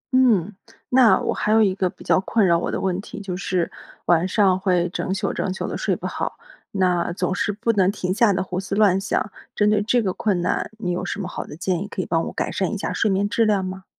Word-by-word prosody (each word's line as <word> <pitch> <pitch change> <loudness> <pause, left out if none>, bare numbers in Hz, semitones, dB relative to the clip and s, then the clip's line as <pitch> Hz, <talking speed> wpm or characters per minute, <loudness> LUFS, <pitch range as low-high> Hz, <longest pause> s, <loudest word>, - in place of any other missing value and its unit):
嗯， 215 -7 +3 0.3
那 250 -3 +5
我 - - -1
还 210 - -1
有 220 0 +5
一 195 -3 +2
个 185 -1 0
比 190 - -14
较 - - +3
困 205 +2 +1
扰 170 -2 +4
我 - - -2
的 - - -2
问 190 0 -1
题， 210 - -9
就 195 -3 -5
是， 180 -2 -1 0.3
晚 175 +1 +3
上 190 -2 +3
会 180 -2 +1
整 185 - -3
宿 190 - -1
整 185 - -2
宿 - - -3
地 - - -4
睡 - - 0
不 - - -8
好， - - -3 0.3
那 180 -3 +1
总 180 +1 -1
是 205 - 0
不 210 +3 0
能 190 -2 +3
停 185 -3 -2
下 225 +1 +4
地 185 - 0
胡 185 -1 -4
思 195 +1 -4
乱 200 -3 +4
想。 205 +1 -1 0.2
针 210 0 +3
对 210 - +3
这 235 +3 +2
个 190 -3 -1
困 200 -3 0
难， 175 - -1
你 180 -5 -2
有 180 +1 -2
什 195 - -4
么 190 - -3
好 - - -5
的 - - -10
建 180 0 -1
议 200 - -4
可 200 - -8
以 - - 0
帮 165 -1 0
我 - - -5
改 - - -2
善 190 +1 -1
一 215 - -2
下 200 - -3
睡 215 - +1
眠 195 +1 +1
质 230 +2 +1
量 205 -3 +2
吗？ 190 +1 -6
190 Hz, 285 characters per minute, -22 LUFS, 180-210 Hz, 0.3 s, 那